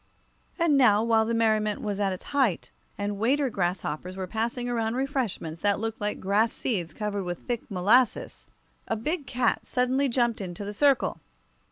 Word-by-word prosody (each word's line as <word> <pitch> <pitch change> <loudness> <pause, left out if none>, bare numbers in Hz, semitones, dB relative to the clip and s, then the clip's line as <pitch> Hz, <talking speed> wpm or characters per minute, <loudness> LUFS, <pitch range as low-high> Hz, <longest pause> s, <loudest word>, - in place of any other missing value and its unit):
And 335 -5 +3
now, 215 -5 +5
while 225 -1 +3
the 230 +1 -1
merriment 215 -2 +1
was 205 -1 -3
at 200 -1 +1
its 185 - -6
height, 265 - 0 0.3
and 205 0 -3
waiter 265 +4 +2
grasshoppers 180 -2 -2
were 190 - -3
passing 230 +5 -2
around 230 -1 -1
refreshments 250 - -2
that 205 -1 +2
looked 225 0 -4
like 210 0 -2
grass 205 +4 +2
seeds 180 -10 -2
covered 205 +3 -3
with 175 -2 -5
thick 240 -2 -3
molasses, 215 +6 +2 0.4
a 225 - 0
big 290 +6 -2
cat 245 0 0
suddenly 260 +2 +1
jumped 235 -3 +1
into 185 +1 -6
the 205 - -5
circle. 275 +4 +2
220 Hz, 170 wpm, -27 LUFS, 200-250 Hz, 0.4 s, now